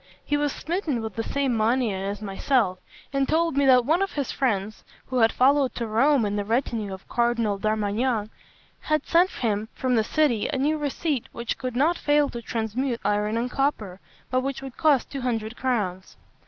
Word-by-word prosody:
He 290 Hz, -, 0 dB
was 290 Hz, 0 st, +1 dB
smitten 315 Hz, -, -2 dB
with 220 Hz, -2 st, -5 dB
the 225 Hz, -, -2 dB
same 270 Hz, 0 st, -1 dB
mania 225 Hz, -1 st, +1 dB
as 200 Hz, +2 st, -4 dB
myself, 195 Hz, -1 st, 0 dB, 0.3 s
and 275 Hz, -1 st, +1 dB
told 330 Hz, -1 st, +2 dB
me 280 Hz, -1 st, +3 dB
that 250 Hz, -2 st, +6 dB
one 325 Hz, +7 st, +2 dB
of 390 Hz, -, -1 dB
his 285 Hz, -4 st, -2 dB
friends, 215 Hz, -5 st, -1 dB, 0.2 s
who 255 Hz, -1 st, -1 dB
had 225 Hz, -1 st, +5 dB
followed 270 Hz, 0 st, +3 dB
to 235 Hz, -, -2 dB
Rome 235 Hz, +3 st, +3 dB
in 205 Hz, 0 st, -1 dB
the 205 Hz, -, 0 dB
retinue 225 Hz, -2 st, -1 dB
of 190 Hz, 0 st, -7 dB
the -, -, -16 dB
Cardinal 235 Hz, -4 st, +1 dB
d'Armagnac, 215 Hz, +2 st, 0 dB, 0.5 s
had 305 Hz, 0 st, -1 dB
sent 350 Hz, +2 st, +4 dB
him 215 Hz, -, -2 dB
from 255 Hz, -1 st, 0 dB
that 220 Hz, -2 st, +2 dB
city 290 Hz, -8 st, +1 dB
a 285 Hz, -, -1 dB
new 300 Hz, +3 st, +1 dB
receipt 290 Hz, -2 st, -2 dB
which 235 Hz, 0 st, -4 dB
could 255 Hz, -2 st, -4 dB
not 310 Hz, +7 st, +2 dB
fail 290 Hz, -1 st, +3 dB
to 235 Hz, -, -6 dB
transmute 235 Hz, +2 st, -2 dB
iron 210 Hz, +2 st, +1 dB
and 245 Hz, +2 st, -2 dB
copper, 215 Hz, -10 st, -1 dB, 0.3 s
but 255 Hz, 0 st, +2 dB
which 270 Hz, 0 st, -4 dB
would 265 Hz, -2 st, -8 dB
cost 290 Hz, -5 st, +2 dB
two 275 Hz, -, -4 dB
hundred 230 Hz, -2 st, -2 dB
crowns. 205 Hz, -8 st, -2 dB
245 Hz, 195 wpm, -25 LUFS, 215-280 Hz, 0.5 s, that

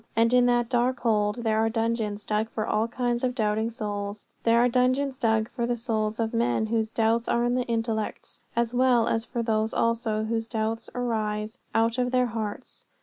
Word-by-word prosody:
And 230 Hz, +2 st, +3 dB
in 250 Hz, 0 st, +5 dB
that 240 Hz, -1 st, +2 dB
dark 250 Hz, +2 st, +1 dB
hold 215 Hz, 0 st, +1 dB
there 220 Hz, -1 st, +1 dB
are 225 Hz, 0 st, +2 dB
dungeons 225 Hz, -2 st, -1 dB
dug 215 Hz, +1 st, 0 dB
for 215 Hz, -2 st, -3 dB
all 215 Hz, +2 st, +1 dB
kinds 240 Hz, 0 st, -1 dB
of 250 Hz, -1 st, 0 dB
doubting 220 Hz, -1 st, 0 dB
souls. 205 Hz, -3 st, -5 dB, 0.2 s
There 230 Hz, 0 st, +3 dB
are 245 Hz, -, +5 dB
dungeons 255 Hz, +2 st, +1 dB
dug 220 Hz, -2 st, +2 dB
for 235 Hz, -1 st, -2 dB
the 240 Hz, -, 0 dB
souls 220 Hz, -2 st, -2 dB
of 225 Hz, 0 st, -1 dB
men 230 Hz, -1 st, +1 dB
whose 220 Hz, 0 st, 0 dB
doubts 230 Hz, +1 st, +1 dB
are 235 Hz, -, +2 dB
in 240 Hz, 0 st, +1 dB
their 250 Hz, -1 st, 0 dB
intellects, 225 Hz, -2 st, -3 dB
as 235 Hz, 0 st, 0 dB
well 245 Hz, -2 st, +3 dB
as 225 Hz, 0 st, 0 dB
for 240 Hz, -2 st, -3 dB
those 220 Hz, -1 st, 0 dB
also 230 Hz, -2 st, 0 dB
whose 225 Hz, 0 st, -2 dB
doubts 225 Hz, 0 st, -2 dB
arise 220 Hz, -1 st, -2 dB, 0.2 s
out 230 Hz, +2 st, +2 dB
of 250 Hz, 0 st, +1 dB
their 250 Hz, 0 st, +2 dB
hearts. 220 Hz, +2 st, -5 dB
230 Hz, 200 wpm, -26 LUFS, 220-240 Hz, 0.2 s, in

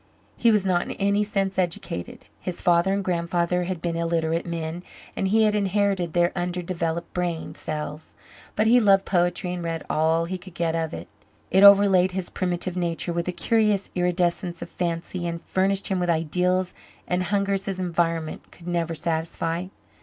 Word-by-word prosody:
He 235 Hz, -, +3 dB
was 210 Hz, -3 st, +3 dB
not 180 Hz, -2 st, +2 dB
in -, -, -5 dB
any 200 Hz, +1 st, +1 dB
sense 195 Hz, -2 st, -1 dB
educated. 170 Hz, -, -3 dB
His 180 Hz, -, -5 dB
father 175 Hz, +2 st, +3 dB
and 200 Hz, 0 st, 0 dB
grandfather 175 Hz, 0 st, 0 dB
had 180 Hz, -2 st, -4 dB
been 170 Hz, -1 st, -1 dB
illiterate 165 Hz, 0 st, 0 dB
men 165 Hz, 0 st, -4 dB, 0.3 s
and 195 Hz, -, 0 dB
he 220 Hz, +3 st, +4 dB
had 215 Hz, -1 st, +3 dB
inherited 200 Hz, -4 st, +1 dB
their 175 Hz, 0 st, +3 dB
underdeveloped 175 Hz, -2 st, -3 dB
brain 175 Hz, -2 st, -2 dB
cells. 150 Hz, 0 st, -6 dB, 0.4 s
But 215 Hz, -, +2 dB
he 240 Hz, +3 st, +6 dB
loved 195 Hz, -3 st, +4 dB
poetry 175 Hz, 0 st, 0 dB
and 175 Hz, -1 st, -4 dB
read 165 Hz, -1 st, -3 dB
all 160 Hz, +2 st, +2 dB
he 185 Hz, +2 st, -4 dB
could 180 Hz, -1 st, -13 dB
get 170 Hz, -1 st, 0 dB
of 165 Hz, -1 st, -1 dB
it. 85 Hz, -, -8 dB, 0.4 s
It 190 Hz, -, +5 dB
overlaid 200 Hz, -2 st, +7 dB
his 185 Hz, -1 st, -4 dB
primitive 180 Hz, 0 st, -2 dB
nature 170 Hz, -1 st, -2 dB
with 170 Hz, +1 st, -2 dB
a -, -, +1 dB
curious 210 Hz, 0 st, +1 dB
iridescence 175 Hz, -1 st, 0 dB
of 170 Hz, -, -11 dB
fancy 175 Hz, 0 st, -3 dB
and 170 Hz, 0 st, -3 dB
furnished 190 Hz, +3 st, 0 dB
him 190 Hz, -2 st, 0 dB
with 175 Hz, -1 st, -1 dB
ideals 180 Hz, +3 st, +1 dB, 0.3 s
and 180 Hz, 0 st, 0 dB
hungers 200 Hz, +1 st, 0 dB
his 195 Hz, -1 st, -3 dB
environment 165 Hz, -3 st, -1 dB
could 175 Hz, -, -14 dB
never 170 Hz, -1 st, -1 dB
satisfy. 165 Hz, +2 st, -2 dB
175 Hz, 175 wpm, -25 LUFS, 170-190 Hz, 0.4 s, overlaid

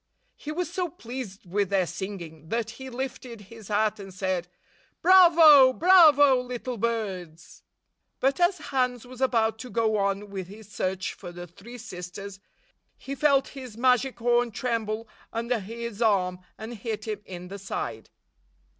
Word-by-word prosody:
He 300 Hz, -, -7 dB
was 350 Hz, +2 st, -2 dB
so 355 Hz, +1 st, -3 dB
pleased 240 Hz, -, -8 dB
with 195 Hz, +2 st, -1 dB
their 195 Hz, -2 st, +2 dB
singing 170 Hz, -5 st, -7 dB
that 230 Hz, -1 st, -2 dB
he 265 Hz, +3 st, -9 dB
lifted 250 Hz, -2 st, -6 dB
his 215 Hz, +1 st, -13 dB
hat 210 Hz, 0 st, +1 dB
and 195 Hz, -1 st, -9 dB
said, 185 Hz, -2 st, -2 dB, 0.6 s
"Bravo! 330 Hz, -7 st, +8 dB
Bravo, 295 Hz, -6 st, +6 dB
little 250 Hz, 0 st, -5 dB
birds 195 Hz, -8 st, -4 dB, 0.3 s
!" -, -, -52 dB
But 270 Hz, +4 st, +1 dB
as 355 Hz, +1 st, +3 dB, 0.2 s
Hans 250 Hz, -2 st, 0 dB
was 255 Hz, +1 st, -11 dB
about 225 Hz, -4 st, +1 dB
to 250 Hz, -, -8 dB
go 220 Hz, -1 st, +1 dB
on 200 Hz, 0 st, -1 dB
with 190 Hz, -3 st, -5 dB
his 210 Hz, +2 st, -12 dB
search 185 Hz, -1 st, -2 dB
for 175 Hz, -, -10 dB
the 175 Hz, 0 st, -8 dB
three 200 Hz, +8 st, -12 dB
sisters, 195 Hz, -2 st, -8 dB, 0.6 s
he 275 Hz, -, -7 dB
felt 275 Hz, -1 st, +2 dB
his 255 Hz, -5 st, -10 dB
magic 255 Hz, +1 st, +2 dB
horn 240 Hz, 0 st, +2 dB
tremble 225 Hz, -1 st, -3 dB, 0.2 s
under 235 Hz, +1 st, -1 dB
his 230 Hz, +2 st, -7 dB
arm 185 Hz, -5 st, +2 dB, 0.2 s
and 220 Hz, +2 st, -7 dB
hit 220 Hz, -1 st, -5 dB
him 210 Hz, -1 st, -4 dB
in 180 Hz, -1 st, -8 dB
the 200 Hz, +1 st, -7 dB
side. 195 Hz, -, -5 dB
225 Hz, 155 wpm, -26 LUFS, 195-255 Hz, 0.6 s, Bravo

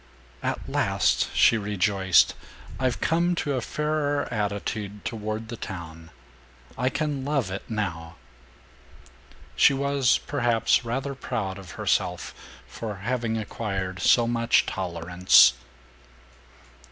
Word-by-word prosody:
"At -, -, -3 dB
last," -, -, +1 dB
she 115 Hz, -, +5 dB
rejoiced, 100 Hz, -2 st, +2 dB, 0.5 s
"I've 130 Hz, -2 st, -1 dB
come 170 Hz, +2 st, +1 dB
to 145 Hz, -4 st, -1 dB
a 130 Hz, -, -1 dB
fairer 150 Hz, +1 st, -1 dB
attitude 105 Hz, -1 st, -3 dB
toward 110 Hz, 0 st, -4 dB
the 120 Hz, -, -5 dB
town. 80 Hz, -4 st, -8 dB, 0.7 s
I 130 Hz, -, 0 dB
can 145 Hz, -2 st, -2 dB
love 140 Hz, -8 st, -1 dB
it, 100 Hz, -, -4 dB
now." 85 Hz, -7 st, -4 dB, 1.4 s
She 140 Hz, -, +5 dB
was, 140 Hz, -2 st, +2 dB
perhaps, 120 Hz, -5 st, +1 dB
rather 135 Hz, +4 st, -3 dB
proud 100 Hz, -7 st, -4 dB
of 95 Hz, -2 st, -11 dB
herself -, -, -1 dB, 0.3 s
for 105 Hz, -, -6 dB
having 120 Hz, -2 st, -1 dB
acquired 95 Hz, -4 st, -4 dB
so 120 Hz, -, +5 dB
much 115 Hz, 0 st, +2 dB
tolerance. 90 Hz, -6 st, +4 dB
110 Hz, 110 wpm, -25 LUFS, 95-130 Hz, 1.4 s, she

